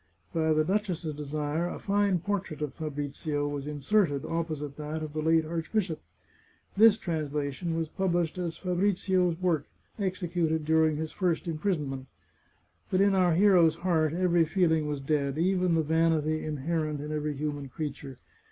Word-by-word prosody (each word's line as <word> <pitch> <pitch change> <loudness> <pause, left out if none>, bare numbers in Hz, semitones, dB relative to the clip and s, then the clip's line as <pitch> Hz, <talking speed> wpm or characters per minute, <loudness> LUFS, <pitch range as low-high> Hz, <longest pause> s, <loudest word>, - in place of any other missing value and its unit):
By 160 -1 +1
the 155 0 +3
duchess's 180 -3 -1
desire 150 +3 -2
a - - -5
fine 200 -3 +1
portrait 195 -6 -3
of 145 -3 -3
Fabrizio 145 -1 -3
was 145 -1 -4
inserted, 150 0 +1
opposite 155 -4 -3
that 155 +1 -4
of 155 -1 -6
the 155 - -2
late 160 0 +3
archbishop. 165 +2 -2 0.7
This 220 +1 +7
translation 155 0 -2
was 165 -1 -1
published 175 -1 -1
as 170 -2 -3
Fabrizio's 180 -1 +1
work, 170 -6 0 0.3
executed 175 -5 -1
during 160 0 +3
his 155 +1 -3
first 180 -3 -1
imprisonment. 150 -6 -2 0.8
But 185 - +2
in 200 0 +4
our 180 -3 +3
hero's 175 -4 +5
heart 165 -3 +1
every 175 0 +3
feeling 160 -2 +2
was 145 -2 -3
dead, 140 -1 0
even 180 0 +2
the 160 - +2
vanity 155 0 +1
inherent 155 0 -2
in 150 +1 -5
every 150 -1 -2
human 145 -1 -4
creature. 140 -2 -6
160 Hz, 150 wpm, -29 LUFS, 150-180 Hz, 0.8 s, This